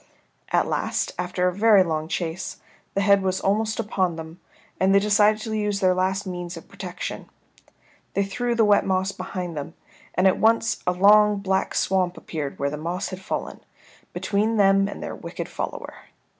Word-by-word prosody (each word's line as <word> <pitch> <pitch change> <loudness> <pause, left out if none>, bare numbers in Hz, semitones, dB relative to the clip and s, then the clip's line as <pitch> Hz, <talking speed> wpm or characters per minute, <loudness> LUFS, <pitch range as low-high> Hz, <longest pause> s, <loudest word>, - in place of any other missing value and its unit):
At - - +2
last, - - -1
after 180 0 0
a 180 - 0
very 205 0 +5
long 155 -2 -2
chase, 165 +1 -4 0.4
the 200 - +2
head 200 0 +4
was 190 0 0
almost 215 +3 0
upon 190 -5 0
them, 160 +2 -9 0.4
and 190 +1 +4
they - - +7
decided 210 +1 +3
to 220 0 -4
use 210 -2 -1
their 185 -2 +3
last 190 +2 0
means 175 -1 -5
of 165 - -11
protection. - - -7 0.9
They 200 - +2
threw 240 +5 -2
the 225 -1 +4
wet 205 -1 +4
moss 190 0 0
behind 180 -2 -5
them, 150 +2 -6 0.4
and 185 - +2
at 190 - +2
once 225 +1 +2
a - - +4
long 205 +3 +5
black 190 -1 -1
swamp 185 -2 +1
appeared 150 -4 -5
where 140 +1 -1
the 150 - -4
moss 175 +5 -3
had 185 0 -7
fallen, - - -4 0.5
between 215 +2 0
them 195 -1 +4
and 200 - -7
their - - -5
wicked - - -6
follower. - - -5
190 Hz, 180 wpm, -24 LUFS, 180-205 Hz, 0.9 s, they